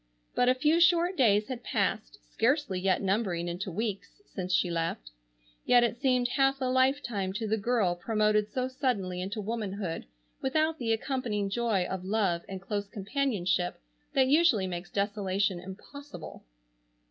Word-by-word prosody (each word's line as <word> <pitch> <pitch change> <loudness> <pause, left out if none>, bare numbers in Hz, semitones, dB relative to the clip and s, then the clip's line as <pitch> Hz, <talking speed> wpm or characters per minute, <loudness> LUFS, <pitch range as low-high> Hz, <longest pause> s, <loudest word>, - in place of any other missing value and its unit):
But 245 - +3
a 255 - +4
few 305 +5 +3
short 345 +1 +4
days 210 - +3
had 255 -2 -5
passed, - - -1
scarcely 250 - +1
yet 190 +2 +1
numbering 190 -4 0
into 180 +3 -4
weeks, 205 - -4
since 185 - -5
she 180 -1 +2
left, 165 - -3 0.5
yet 245 -1 +5
it 235 - +1
seemed 255 -2 +3
half 270 +1 +2
a 260 - -1
lifetime 255 -7 +1
to 220 +2 -3
the 215 - +2
girl 220 -4 +1
promoted 210 +2 +1
so 255 0 -1
suddenly 240 -10 -2
into 195 +4 -4
womanhood 205 - -4 0.3
without 315 +4 +1
the 230 -2 -1
accompanying 225 -4 -1
joy 220 -5 +1
of 190 0 -4
love 190 -4 0
and 190 -1 -6
close 205 0 -3
companionship 195 -4 -1 0.3
that 265 -1 +4
usually 285 - +4
makes 175 -1 -5
desolation 200 -2 0
impossible. 215 +11 -10
215 Hz, 150 wpm, -29 LUFS, 190-255 Hz, 0.5 s, yet